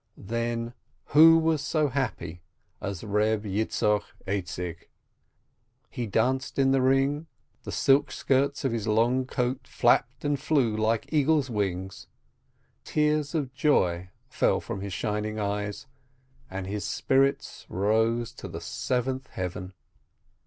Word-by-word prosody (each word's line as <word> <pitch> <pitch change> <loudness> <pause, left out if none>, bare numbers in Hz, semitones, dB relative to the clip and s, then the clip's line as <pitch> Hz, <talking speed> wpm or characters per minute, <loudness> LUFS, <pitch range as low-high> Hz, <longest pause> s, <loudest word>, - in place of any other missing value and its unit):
Then 115 +2 -3 0.4
who 165 +2 +9
was 160 -2 +1
so 150 +1 +1
happy 110 -11 -3 0.4
as 100 -1 -4
Reb 105 0 +1
Yitzchok 105 0 +1 0.2
Aizik? 90 -3 -4 1.0
He 120 -3 -3
danced 130 +6 0
in 135 -1 +4
the 135 -1 +3
ring, 135 +4 +2 0.4
the - - -5
silk 140 +2 +3
skirts 140 +1 0
of 135 - +1
his 115 -2 -2
long 120 +4 +2
coat 125 0 -2
flapped - - +2
and 145 -1 +1
flew 130 -8 +1
like 110 +5 0
eagles' 150 -3 +2
wings, 95 -3 -3 0.8
tears 150 0 0
of 140 -5 -2
joy 90 - +1 0.2
fell - - +1
from 95 - -6
his 100 0 -5
shining 105 +3 -2
eyes, 105 +1 -3 0.6
and 95 0 -5
his 100 +2 -4
spirits 135 +5 0
rose 110 +4 +1
to - - -8
the - - -6
seventh 130 +1 -2
heaven. 90 0 -5
115 Hz, 125 wpm, -27 LUFS, 105-135 Hz, 1.0 s, who